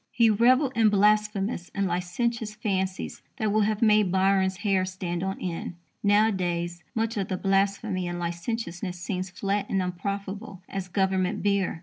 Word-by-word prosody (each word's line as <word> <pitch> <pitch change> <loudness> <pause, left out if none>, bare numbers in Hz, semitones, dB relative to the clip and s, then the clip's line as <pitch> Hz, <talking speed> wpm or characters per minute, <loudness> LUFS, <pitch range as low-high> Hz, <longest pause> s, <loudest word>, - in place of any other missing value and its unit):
He 230 -2 +4
revelled 255 +5 +4
in 225 -2 +5
blasphemous 210 -1 +2
and 200 0 +1
licentious 210 +5 -2
fancies 190 -3 -2 0.2
that 220 -4 0
would 215 0 +3
have 215 +2 0
made 210 -4 +4
Byron's 190 0 +2
hair 195 -2 +3
stand 185 -2 -3
on 190 +1 -3
end. 175 -1 -4 0.3
Nowadays, 180 -5 +1
much 225 0 -1
of 195 - -1
the 185 - -2
blasphemy 195 -1 0
and 175 0 -3
licentiousness 175 +1 -4
seems 185 +1 -3
flat 200 +2 -2
and 195 - +1
unprofitable 195 +2 -4
as 195 -1 -4
Government 190 -1 0
beer. 200 -4 +1
195 Hz, 150 wpm, -27 LUFS, 185-210 Hz, 0.3 s, in